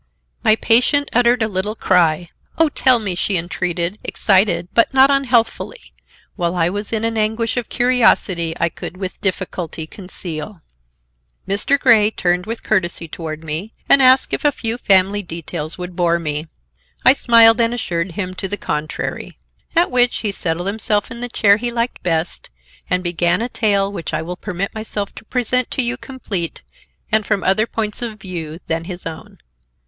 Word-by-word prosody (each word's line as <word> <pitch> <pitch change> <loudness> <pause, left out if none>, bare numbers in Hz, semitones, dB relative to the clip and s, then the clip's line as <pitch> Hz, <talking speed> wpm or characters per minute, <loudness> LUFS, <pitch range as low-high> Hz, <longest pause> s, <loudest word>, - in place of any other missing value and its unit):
My 215 - +5
patient 250 +6 +3
uttered 240 0 +3
a - - +1
little 205 +1 -3
cry. 175 -4 +2 0.3
"Oh, 325 -1 +4
tell 260 -3 +3
me," 205 -5 -3
she 185 +2 -1
entreated, 175 +2 -2
excited, 185 -4 +2
but 230 - +4
not 265 +1 +6
unhealthfully; 260 - 0 0.4
while 175 -2 -1
I 170 0 +1
was 205 +1 -5
in 225 -1 -1
an 225 -1 0
anguish 220 +2 0
of 245 -2 -3
curiosity 220 -9 +2
I 170 - +2
could 170 - -8
with 190 -1 -6
difficulty 180 -4 -3
conceal. 180 -1 -7 0.9
Mr. 210 +8 +2
Grey 220 -5 +5
turned 180 -3 -1
with 230 +1 -5
courtesy 175 -5 -1
toward 160 0 -7
me 160 +8 -3
and 275 - +6
asked 260 0 +5
if - - -1
a 295 - +4
few 230 -2 -3
family 195 0 +3
details 165 -3 -6
would 180 -1 -7
bore 170 -1 +2
me. 155 -1 -2 0.6
I 260 - +9
smiled 230 -3 +5
and 230 0 +2
assured 175 -7 -3
him 185 0 -4
to 195 - -4
the 205 +2 -4
contrary. 155 -4 -4 0.4
At 340 +2 +3
which 245 -1 +3
he 210 - 0
settled 175 -2 -2
himself 205 0 -1
in 235 - -7
the 245 - -4
chair 205 -3 +4
he 240 +2 -3
liked 235 +1 -2
best 165 -1 -2 0.4
and 180 0 +1
began 175 +1 +1
a 235 +2 -2
tale 200 -4 +1
which 165 -4 -4
I 155 - -2
will 180 +2 -5
permit 195 0 -4
myself 215 -2 -4
to - - -12
present 250 +1 0
to 260 - 0
you 240 +1 0
complete 220 -10 -4 0.5
and 220 -1 +3
from 205 -2 -1
other 205 +4 +2
points 215 -1 -3
of 220 -3 -5
view 165 -5 -6
than 165 0 -2
his 180 0 -8
own. 165 -1 -8
200 Hz, 175 wpm, -19 LUFS, 175-230 Hz, 0.9 s, I